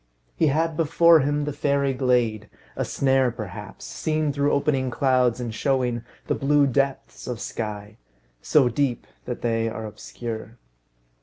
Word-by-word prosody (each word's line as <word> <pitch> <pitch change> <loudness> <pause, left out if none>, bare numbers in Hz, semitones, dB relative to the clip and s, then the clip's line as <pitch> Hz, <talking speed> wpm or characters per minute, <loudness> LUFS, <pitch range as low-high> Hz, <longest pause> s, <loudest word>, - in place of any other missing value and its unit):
He 160 - +2
had 160 +3 +1
before 165 +1 +5
him 145 +1 0
the 150 - -3
fairy 140 -1 +1
glade, 120 -5 +1 0.3
a - - -1
snare 135 -2 +2
perhaps, 105 -3 -8
seen 155 -2 -1
through 140 +1 +1
opening 135 -2 +1
clouds, 125 -2 +2
and 120 -2 -4
showing 125 -2 0 0.2
the - - 0
blue 145 +1 +3
depths 135 0 -1
of 125 -3 -4
sky; 105 -1 -5 0.4
so 145 -5 +4
deep, 125 +1 -1 0.2
that 125 - -5
they 115 -1 +1
are 110 0 -6
obscure. 110 +1 -7
130 Hz, 145 wpm, -24 LUFS, 115-145 Hz, 0.4 s, before